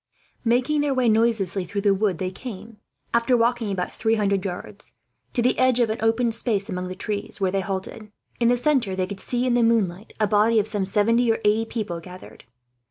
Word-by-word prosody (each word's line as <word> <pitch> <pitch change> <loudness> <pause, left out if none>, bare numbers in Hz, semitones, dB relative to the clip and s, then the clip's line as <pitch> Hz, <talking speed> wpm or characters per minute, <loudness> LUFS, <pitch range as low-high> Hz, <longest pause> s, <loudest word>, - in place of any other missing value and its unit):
Making 255 +5 +2
their 285 -2 0
way 255 -2 +2
noiselessly 220 -4 +2
through 200 +4 -3
the 200 -1 +3
wood 195 -3 0
they 185 +1 -3
came, 215 +1 -9 0.4
after 235 +1 +3
walking 235 -1 +1
about 180 -2 -2
three 225 0 0
hundred 200 -3 0
yards, 180 -2 -7 0.4
to 240 - 0
the 250 - +3
edge 255 -1 +3
of 230 -3 +2
an 220 - -3
open 225 +1 +2
space 220 -3 -1
among 180 0 -3
the 185 - -6
trees, 205 +2 -3
where 190 -2 +1
they 195 0 0
halted. 195 +3 -5 0.3
In 235 - +3
the 245 +1 +3
centre 245 -8 +1
they 185 -1 0
could 195 +1 -7
see, 245 +4 -1
in 250 - +2
the 240 - +3
moonlight, 215 -4 +1
a 215 - +3
body 215 +2 +3
of 210 - 0
some 205 -3 -2
seventy 230 +4 +2
or 225 - 0
eighty 215 +2 +3
people 210 -7 -4
gathered. 180 -3 -13
220 Hz, 215 wpm, -24 LUFS, 195-235 Hz, 0.4 s, the